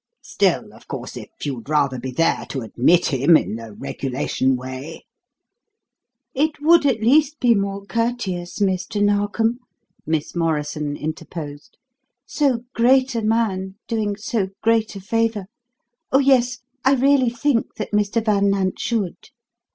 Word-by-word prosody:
Still, - - 0
of - - -18
course, - - -6
if - - -8 0.2
you'd 135 -2 -5
rather 140 -4 +1
be 130 +2 -5
there 165 +6 0
to 135 - -3
admit 135 +9 +2
him 140 +5 +6
in 110 - -3
the 115 -1 -9
regulation 130 +1 -1
way 130 +5 -7 0.6
" 255 - -60
"It 305 +3 0
would 320 0 +5
at 225 -5 0
least 295 +5 +3
be 245 -2 +4
more 200 -1 -2
courteous, 220 -6 -2
Mr. 195 0 -1
Narkom," 205 +3 +1 0.5
Miss 160 0 -2
Morrison 150 -3 -1
interposed. 150 -1 -7 0.5
"So 265 -6 0
great 260 +3 +3
a 230 - -1
man 210 -4 0
doing 215 -3 -1
so 215 -2 -2 0.2
great 225 -1 +2
a - - -6
favour 225 0 -1 0.7
Oh, 265 - +5
yes, 250 -2 +3 0.2
I 270 +1 +4
really 270 -1 +3
think 240 +1 0
that 215 - -5
Mr. 210 +2 +1
Van 200 -2 +3
Nant 195 -1 0
should." 215 -7 -3
205 Hz, 145 wpm, -21 LUFS, 160-240 Hz, 0.7 s, him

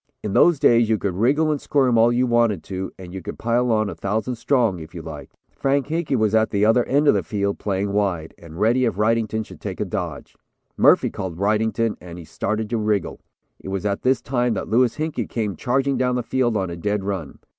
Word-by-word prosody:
In 105 - -3
those 175 -3 +5
days 120 -3 +4
you 110 - +3
could 100 -2 -2
wriggle 140 - +2
and 145 - -2
squirm 130 -4 +2
all 115 +1 +5
you 125 +1 +2
wanted 115 -8 +2
to 95 0 -5
and 90 -1 -10
you 95 - -6
could - - -7
pile 120 +1 +1
on 110 -1 +2
a 100 - -4
thousand 110 +5 -2
strong, 115 -6 +1
if 80 +2 -11
you 85 - -7
liked. 75 -2 -10
Frank 140 0 0
Hinkey 160 -3 -1
was 110 -3 +1
at 110 0 +3
the 100 0 +1
other 115 +3 +4
end 145 +2 +2
of - - +7
the 100 - +1
field 100 +3 -2
playing 100 0 -2
wide, 95 -6 -1
and 85 0 -11
ready 120 +4 +3
if 115 - 0
Wrightington 110 0 0
should - - -14
take - - -5
a - - 0
dodge. - - -5 0.4
Murphy - - +4
caught 90 -3 -5
Wrightington 110 +3 0
and 85 -1 -10
he 85 - -9
started 110 +6 -3
to 120 - +1
wriggle. 105 -3 -1 0.4
It - - -11
was 95 +1 -3
at 100 -1 -1
this 130 -2 +2
time 120 -2 0
that - - -4
Louis 120 +1 +2
Hinkey 155 -7 -3
came 105 -5 -2
charging 135 - 0
down 125 0 +1
the 125 - -1
field 120 -2 0
on 95 -3 -2
a - - -5
dead 105 +3 -2
run. 95 -8 -4
110 Hz, 230 wpm, -22 LUFS, 100-125 Hz, 0.4 s, of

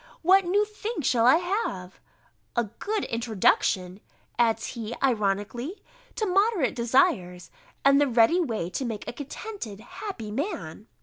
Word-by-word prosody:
What 380 +3 +5
new 405 +4 +2
thing 425 -3 -5
shall 240 -2 +3
I 260 - +8
have?" 340 - -2 0.6
"A 240 - +2
good 405 - -3
introduction," 205 -4 +1 0.4
adds 225 -1 +2
he, 230 0 -5
ironically, 235 - -1 0.4
"to 435 - -1
moderate 390 - +2
desires, 195 -7 +1 0.3
and 275 +1 +6
the 290 - +4
ready 240 +7 +4
way 225 - -2
to 265 - -3
make 225 -4 -5
a - - -4
contented 285 - -7
happy 235 - -7
man." 215 - -4
240 Hz, 135 wpm, -26 LUFS, -, 0.6 s, I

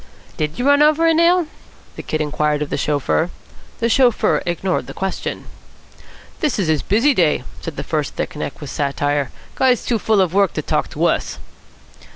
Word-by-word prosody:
"Did 150 +1 -3
you 245 - -2
run 285 +1 +5
over 305 +2 +4
a 330 - +5
nail?" 340 +2 +4 0.5
the - - -6
Kid 155 - -3
inquired 150 0 0
of 150 - -8
the - - 0
chauffeur. 150 +3 0 0.5
The 230 - +1
chauffeur 240 -1 +3
ignored 175 -5 -1
the 135 - -9
question. 190 0 -4 0.9
"This 300 -5 0
is 185 -6 0
his 155 -3 +2
busy 235 +8 +3
day," 160 - +2 0.2
said 165 - -6
the - - -4
first 155 -3 -2
thick - - -4
neck 150 0 -5
with 145 - -6
satire. 145 -1 -1 0.2
"Guy's 255 -2 +2
too 235 -3 0
full 215 0 +2
of 185 -3 +2
work 195 -2 +3
to - - -3
talk - - -1
to - - -1
us." - - 0
180 Hz, 190 wpm, -19 LUFS, 150-250 Hz, 0.9 s, run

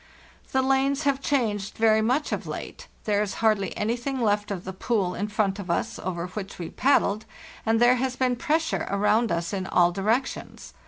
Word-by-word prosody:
" - - -27
The 265 0 +2
lanes 270 +2 +2
have 275 -1 +1
changed 220 -8 -1
very 220 -1 +4
much 255 +7 +1
of - - -3
late; - - -7 0.2
there 205 -1 +1
is 210 -2 -2
hardly 215 -3 +1
anything 240 +5 -1
left 210 -3 +1
of 190 -3 -4
the 190 - -6
pool 190 -1 0
in 205 - -2
front 205 -2 0
of 190 -3 -7
us, 220 +7 -1
over 175 -2 -3
which 195 +1 -7
we 170 -2 -6
paddled, 220 -6 +2 0.4
and 225 0 +3
there 245 +1 +5
has 260 0 -1
been 255 -1 +1
pressure 320 +4 0
around 210 +3 +2
us 170 +1 -1
in 190 -1 -2
all 175 -2 +4
directions. 220 +8 -2
215 Hz, 195 wpm, -26 LUFS, 195-255 Hz, 0.4 s, there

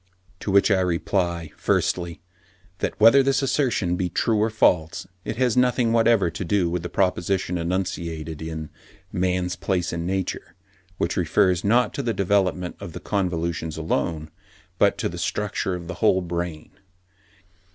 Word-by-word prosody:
To - - -5
which 100 +2 +4
I 95 - +4
reply, 85 -2 -1
firstly, 85 -2 -1 0.6
that - - -3
whether 115 +6 +7
this 135 0 +1
assertion 120 -10 +1
be 90 -1 -1
true 110 +2 +1
or 110 - +2
false, 90 -8 +2 0.2
it - - -4
has 125 -1 +1
nothing 125 -2 +2
whatever 115 -6 +3
to 90 - -5
do 90 -1 +1
with 90 0 -1
the 90 - -5
proposition 90 0 0
enunciated 85 -3 -3
in 80 -1 -6 0.4
'Man's 90 0 0
Place 90 -1 -1
in 85 +1 -3
Nature,' 95 -1 -3 0.4
which - - -1
refers 90 -2 +2
not 115 +2 +3
to 140 - -2
the 115 -4 -1
development 95 -2 0
of 85 - -8
the - - -6
convolutions 85 -4 -2
alone, 80 -1 -2 0.5
but - - +4
to - - -1
the - - -6
structure 100 -2 -2
of 90 -1 -7
the 95 - -4
whole 95 - +4
brain. 85 -2 -4
90 Hz, 155 wpm, -24 LUFS, 85-105 Hz, 0.6 s, whether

